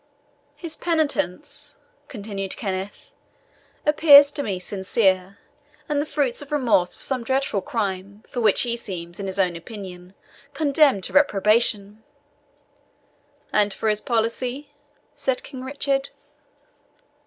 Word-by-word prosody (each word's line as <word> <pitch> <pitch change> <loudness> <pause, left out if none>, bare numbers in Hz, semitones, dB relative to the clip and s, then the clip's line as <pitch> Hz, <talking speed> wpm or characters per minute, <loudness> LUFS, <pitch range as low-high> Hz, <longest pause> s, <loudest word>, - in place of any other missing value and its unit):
"His 320 +2 0
penitence," 290 - -2 0.3
continued 200 -5 -6
Kenneth, 195 - -5 0.7
"appears 290 -2 +8
to 290 - -3
me 200 -8 -2
sincere, 190 0 0 0.5
and 290 -1 0
the 300 - -4
fruits 280 -5 0
of 290 - -11
remorse 235 -11 +2
for - - -6
some 260 -3 -2
dreadful 265 -5 0
crime, 200 0 -4
for 245 - -4
which 215 -3 +4
he 235 -1 0
seems, 175 -6 -7
in 200 - -4
his 190 - -4
own 180 -3 +1
opinion, 180 0 -10 0.4
condemned 285 -8 +3
to - - -1
reprobation." 215 -5 +2 1.5
"And 205 -2 +3
for 220 - -1
his 210 0 +1
policy?" 245 +4 -1 0.4
said 265 -2 -2
King 255 -1 -9
Richard. 275 0 -1
225 Hz, 120 wpm, -23 LUFS, 195-280 Hz, 1.5 s, appears